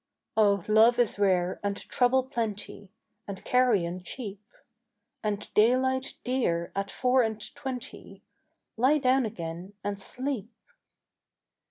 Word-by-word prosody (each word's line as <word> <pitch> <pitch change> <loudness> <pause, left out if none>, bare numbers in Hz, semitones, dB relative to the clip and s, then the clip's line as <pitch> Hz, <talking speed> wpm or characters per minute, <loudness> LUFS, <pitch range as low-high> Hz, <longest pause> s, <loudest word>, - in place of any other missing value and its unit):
"Oh 200 -4 +3
love 220 +3 +6
is 235 -4 +1
rare 185 -3 +2
and 200 0 -2
trouble 255 +1 +2
plenty 215 -5 -4 0.4
And 200 -2 -7
carrion 200 -9 +2
cheap, 205 +1 -6 0.8
And 210 -1 -3
daylight 260 +4 +2
dear 200 -10 0
at 195 0 -2
four 255 0 +2
and 220 -2 -1
twenty: 260 -1 -7 0.5
Lie 260 +6 +4
down 260 -2 +3
again 175 0 -7
and 205 -1 -3
sleep." 250 -2 -4
220 Hz, 115 wpm, -28 LUFS, 200-255 Hz, 0.8 s, love